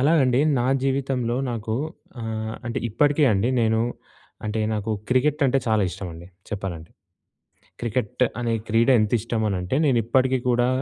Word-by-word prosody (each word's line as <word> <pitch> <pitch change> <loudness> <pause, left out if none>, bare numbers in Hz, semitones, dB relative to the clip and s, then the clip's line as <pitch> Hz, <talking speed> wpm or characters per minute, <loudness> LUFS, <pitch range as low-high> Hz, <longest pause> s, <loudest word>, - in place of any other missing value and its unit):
అలాగండి. 135 -3 +4 0.2
నా 120 - +1 0.2
జీవితంలో 130 -3 0
నాకు 110 -1 -3 0.5
ఆహ్, 110 -1 -4
అంటే 120 - -2
ఇప్పటికే 145 +6 +3
అండి 100 +4 +1
నేను 110 0 +2 0.6
అంటే, 110 +1 -1
నాకు 105 0 -2 0.2
క్రికెట్ 145 +4 +2
అంటే 135 +1 +3
చాలా 110 -2 +3
ఇష్టమండి 85 -2 -8 0.2
చెప్పాలంటే. 90 -6 -5 0.9
క్రికెట్ 120 +1 -1 0.2
అనే 120 -1 0
క్రీడ 115 +3 +3
ఎంత 105 -1 +1
ఇష్టం 115 0 -2
అని 100 -2 0
అంటే 90 +8 -2
నేను 130 -4 +3
ఇప్పటికీ 130 +2 +2
కూడా 120 0 +3
115 Hz, 145 wpm, -24 LUFS, 110-130 Hz, 0.9 s, అలాగండి